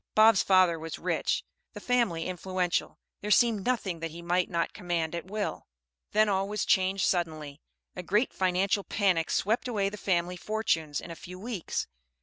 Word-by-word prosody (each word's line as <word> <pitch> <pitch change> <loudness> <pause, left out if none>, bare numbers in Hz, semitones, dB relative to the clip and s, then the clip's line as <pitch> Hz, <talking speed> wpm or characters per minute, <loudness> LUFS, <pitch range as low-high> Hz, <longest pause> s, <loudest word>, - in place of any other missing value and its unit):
Bob's 215 -2 +7
father 185 -3 +4
was 160 0 -6
rich, - - -1 0.3
the - - -7
family 230 -10 +1
influential, 185 -1 -2 0.2
there 210 - -4
seemed 220 -2 +4
nothing 200 -9 -1
that 165 0 -3
he 165 +2 -10
might 175 +1 +1
not 170 -1 -1
command 170 -2 -2
at 170 +1 -5
will. 210 0 -3 0.4
Then 215 0 +4
all 195 -1 0
was 210 -1 -1
changed 190 +1 +2
suddenly; 155 -5 -2 0.3
a 180 - -4
great 210 +8 +1
financial 190 +2 +1
panic 185 -7 +1
swept 220 +5 0
away 205 -5 0
the 210 - -8
family 180 -2 0
fortunes 170 -8 -1
in 170 - -9
a - - -6
few 180 +2 -10
weeks. 210 -3 -3
185 Hz, 170 wpm, -29 LUFS, 170-210 Hz, 0.4 s, Bob's